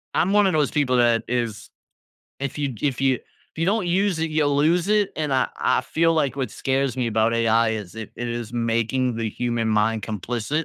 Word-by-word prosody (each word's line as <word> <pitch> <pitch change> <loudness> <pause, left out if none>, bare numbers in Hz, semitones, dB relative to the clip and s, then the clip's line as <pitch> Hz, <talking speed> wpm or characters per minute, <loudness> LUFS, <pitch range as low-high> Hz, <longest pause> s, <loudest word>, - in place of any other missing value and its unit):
I'm 185 +4 +2
one 205 -1 +4
of 185 - +1
those 150 -2 +1
people 140 -4 +1
that 120 -1 +3
is, 115 -3 -3 0.7
if 140 +1 -4
you 140 -4 -2
if 135 -4 0
you 135 -1 +3
if 125 - -15
you 165 - +1
don't 200 0 +1
use 185 0 +1
it, 160 0 -1
you'll 145 -2 +1
lose 170 +5 +2
it. 210 -2 +2
And 150 -3 -1
I 130 -1 +2
I - - +2
feel 165 +1 +1
like 140 -5 +1
what 130 -5 -3
scares 135 -1 -1
me 125 -2 0
about 110 0 +1
AI 115 0 +3
is 105 -5 -5
it 110 -1 -7
it 120 - -4
is 120 -1 -5
making 115 +1 0
the 115 -2 -2
human 120 -1 -1
mind 110 +1 +1
complicit, 120 - -3
125 Hz, 215 wpm, -23 LUFS, 115-155 Hz, 0.7 s, one